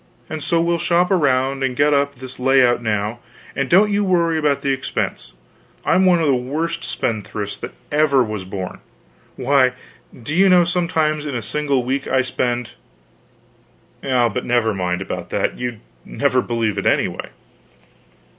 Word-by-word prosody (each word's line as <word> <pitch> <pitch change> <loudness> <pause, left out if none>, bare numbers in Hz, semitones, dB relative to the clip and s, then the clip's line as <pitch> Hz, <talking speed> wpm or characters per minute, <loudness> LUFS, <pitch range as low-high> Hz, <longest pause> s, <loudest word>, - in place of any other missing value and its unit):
And 155 - -4
so 165 +3 +1
we'll 170 0 +1
shop 175 +2 +2
around 135 -5 +1
and 130 -2 -1
get 145 +2 +3
up 140 0 +1
this 130 0 -10
layout 125 -2 +4
now, 105 0 -2 0.4
and 140 -1 -1
don't 205 +4 +5
you 205 0 +1
worry 170 -4 +2
about 145 -2 0
the 140 - +1
expense. 130 -1 -4 0.5
I'm 185 0 +3
one 175 -2 +4
of 165 - +1
the 140 - +3
worst 155 +7 -2
spendthrifts 105 -2 -3
that - - -8 0.2
ever 145 -3 +3
was 105 -4 -4
born. 95 -1 -6 0.6
Why, 130 -1 +3 0.5
do 145 - -3
you 195 +2 +5
know, 180 -1 +6
sometimes 160 -4 0
in 140 - -4
a 120 - -2
single 140 +1 0
week 135 +3 -2
I 130 0 +2
spend 125 -1 -2 1.3
but 125 -5 +1
never 120 -2 +1
mind 90 -1 -2
about - - -6
that - - -1
you'd 120 -3 -4 0.2
never 125 - 0
believe 115 -5 -1
it - - -1
anyway." - - 0
135 Hz, 160 wpm, -20 LUFS, 120-160 Hz, 1.3 s, know